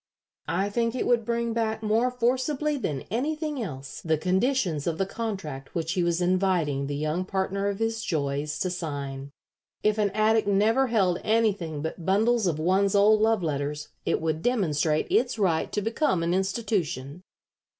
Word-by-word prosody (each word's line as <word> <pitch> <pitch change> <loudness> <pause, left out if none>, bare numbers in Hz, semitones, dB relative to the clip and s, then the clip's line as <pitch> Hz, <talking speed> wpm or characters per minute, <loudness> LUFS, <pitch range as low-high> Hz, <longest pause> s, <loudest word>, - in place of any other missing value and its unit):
I 190 +6 0
think 230 +2 0
it 255 - -1
would 240 -2 +3
bring 235 0 -1
back 220 -1 -1
more 225 +4 +2
forcibly 260 +5 0
than 150 - -3
anything 300 +4 -2
else 140 -9 -6
the 160 -1 +1
conditions 185 - 0
of 165 -2 -1
the 195 - +1
contract 190 -11 -5
which 165 -1 -1
he 185 -1 0
was 170 0 +1
inviting 175 -6 +1
the 145 - -3
young 155 +5 -1
partner 195 +1 -1
of 200 -1 -1
his 225 +1 -1
joys 145 -1 -2
to 185 - 0
sign. 140 -5 -5 0.5
If 215 0 +2
an 205 -1 +3
attic 220 0 +3
never 220 +6 +3
held 190 -7 +2
anything 200 -9 0
but 160 +2 -5
bundles 215 +4 +2
of 165 -4 0
one's 190 +5 +2
old 210 +1 +5
love 220 -3 +2
letters 150 -1 -3
it - - 0
would 160 -1 -1
demonstrate 160 - +1
its 245 -1 +2
right 175 -6 +1
to 210 - -1
become 225 - +1
an 170 +1 +1
institution." 185 - -2
195 Hz, 170 wpm, -26 LUFS, 160-225 Hz, 0.5 s, old